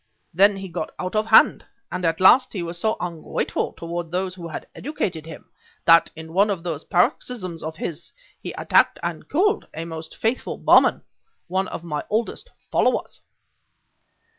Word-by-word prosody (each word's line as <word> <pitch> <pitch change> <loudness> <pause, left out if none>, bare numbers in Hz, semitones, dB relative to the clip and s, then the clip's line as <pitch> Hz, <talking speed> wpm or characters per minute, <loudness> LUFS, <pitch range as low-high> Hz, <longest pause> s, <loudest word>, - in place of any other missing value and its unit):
Then 200 +4 +5
he 195 0 -6
got 165 -3 -4
out 185 +3 -4
of 215 +1 +1
hand; 220 - +6 0.3
and 180 - -4
at 165 0 +1
last 245 +8 +6
he 185 -5 -3
was 170 0 -5
so 220 +3 0
ungrateful 170 -3 -3
toward 170 0 -5
those 185 +2 -2
who 175 -2 -8
had 160 - -6
educated 180 - -4
him, 160 - -11 0.3
that, 165 0 +6
in 160 0 -10
one 200 +4 +4
of 190 -5 -2
those 165 -3 -4
paroxysms 230 - 0
of 160 +1 -5
his, 165 -3 -6 0.3
he - - -5
attacked - - +3
and - - -4
killed 410 +7 +1
a 165 +1 -4
most 160 -1 -8
faithful 230 +3 -1
Burman, - - +4 0.4
one 190 +2 -1
of 170 - -7
my 150 -3 -3
oldest 230 - -2 0.2
followers." - - 0
180 Hz, 165 wpm, -23 LUFS, 165-210 Hz, 0.4 s, hand